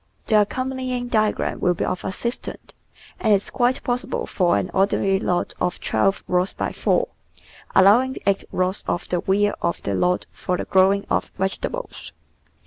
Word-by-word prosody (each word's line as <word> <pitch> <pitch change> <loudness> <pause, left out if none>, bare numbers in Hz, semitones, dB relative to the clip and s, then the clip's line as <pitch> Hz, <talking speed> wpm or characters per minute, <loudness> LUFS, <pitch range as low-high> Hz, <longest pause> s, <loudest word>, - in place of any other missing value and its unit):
The 215 -2 +4
accompanying 255 +2 -2
diagram 215 -2 0
will 180 -1 +2
be - - -1
of 185 - -3
assistance, 235 +6 -5 0.5
and 220 - +2
is 195 - -3
quite 250 +1 +1
possible 250 0 -2
for 180 -3 +2
an 185 - -2
ordinary 195 0 +2
lot 175 -2 -1
of 180 0 -1
twelve 195 0 +1
rods 180 +1 +1
by - - -3
four, - - +1 0.7
allowing 235 +8 +5
eight 200 0 +2
rods 185 +1 -1
of 175 - -2
the 175 - +1
rear 205 +3 +2
of 170 - -1
the 100 - -1
lot 180 - +1
for 180 - -2
the - - -4
growing 195 +1 +3
of - - 0
vegetables. 340 - -4
195 Hz, 160 wpm, -22 LUFS, 185-245 Hz, 0.7 s, allowing